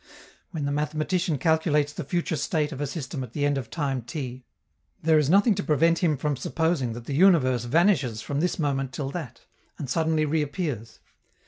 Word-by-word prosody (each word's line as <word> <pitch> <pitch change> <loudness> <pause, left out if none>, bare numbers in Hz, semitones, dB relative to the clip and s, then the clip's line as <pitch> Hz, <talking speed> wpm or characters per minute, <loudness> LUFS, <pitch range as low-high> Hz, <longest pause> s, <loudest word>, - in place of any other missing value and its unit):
When 155 -5 -4
the 140 - -1
mathematician 155 +3 0
calculates 150 -2 +2
the 170 - -5
future 170 +2 -1
state 150 +1 -1
of 140 - -6
a 145 - -1
system 135 -3 -5
at 120 -2 -10
the 145 - 0
end 145 0 +2
of 125 - -7
a - - -30
time 135 -3 -2
t, 125 +1 -6 0.6
there 160 -1 +5
is 150 -2 +1
nothing 200 +5 +5
to 195 0 -3
prevent 165 +3 +3
him 160 -5 +2
from 145 +1 -1
supposing 145 -2 -1
that 120 0 -8
the 140 - -4
universe 135 -8 +4
vanishes 145 - +2
from 140 +4 -3
this 180 +3 0
moment 135 -4 -1
till 135 -1 -3
that, 140 -9 -7 0.4
and 145 - -5
suddenly 160 -1 +1
reappears. 150 - -2
150 Hz, 195 wpm, -26 LUFS, 135-165 Hz, 0.6 s, there